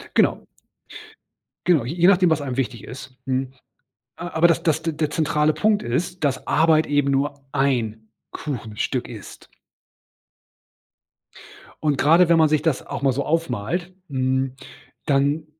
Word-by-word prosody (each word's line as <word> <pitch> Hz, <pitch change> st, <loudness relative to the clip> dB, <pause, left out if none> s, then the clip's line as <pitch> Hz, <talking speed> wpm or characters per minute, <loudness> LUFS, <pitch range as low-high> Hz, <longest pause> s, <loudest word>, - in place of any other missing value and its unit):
Genau. -, -, +2 dB, 1.2 s
Genau, 160 Hz, -9 st, +3 dB
j 130 Hz, +7 st, -4 dB
je 175 Hz, +1 st, +4 dB
nachdem, 185 Hz, -2 st, +5 dB
was 155 Hz, -2 st, +1 dB
einem 130 Hz, -3 st, -4 dB
wichtig 125 Hz, -3 st, -3 dB
ist, 130 Hz, +1 st, -10 dB
mhm. 130 Hz, 0 st, -2 dB, 0.6 s
A 175 Hz, -, -6 dB
aber 160 Hz, +1 st, +5 dB
das 170 Hz, -, +1 dB
das 160 Hz, -1 st, +1 dB
de 165 Hz, 0 st, -1 dB
der 150 Hz, -1 st, -2 dB
zentrale 150 Hz, 0 st, +1 dB
Punkt 210 Hz, -1 st, +2 dB
ist, 170 Hz, +9 st, -3 dB
dass 135 Hz, -2 st, -1 dB
Arbeit 155 Hz, +1 st, +3 dB
eben 145 Hz, -1 st, +1 dB
nur 140 Hz, 0 st, -1 dB
ein 115 Hz, -6 st, -1 dB, 0.2 s
Kuchenstück 115 Hz, -8 st, -4 dB
ist. -, -, -11 dB, 2.4 s
Und, 145 Hz, -3 st, +1 dB
gerade 165 Hz, +4 st, +5 dB
wenn 170 Hz, -, +5 dB
man 160 Hz, -1 st, +5 dB
sich 150 Hz, -1 st, +1 dB
das 160 Hz, -5 st, -1 dB
auch -, -, -5 dB
mal 135 Hz, -1 st, +3 dB
so 140 Hz, +2 st, -3 dB
aufmalt, 165 Hz, -, -2 dB, 0.2 s
hm, 130 Hz, -1 st, -1 dB, 0.5 s
dann 145 Hz, +2 st, +1 dB
145 Hz, 145 wpm, -22 LUFS, 130-160 Hz, 2.4 s, nachdem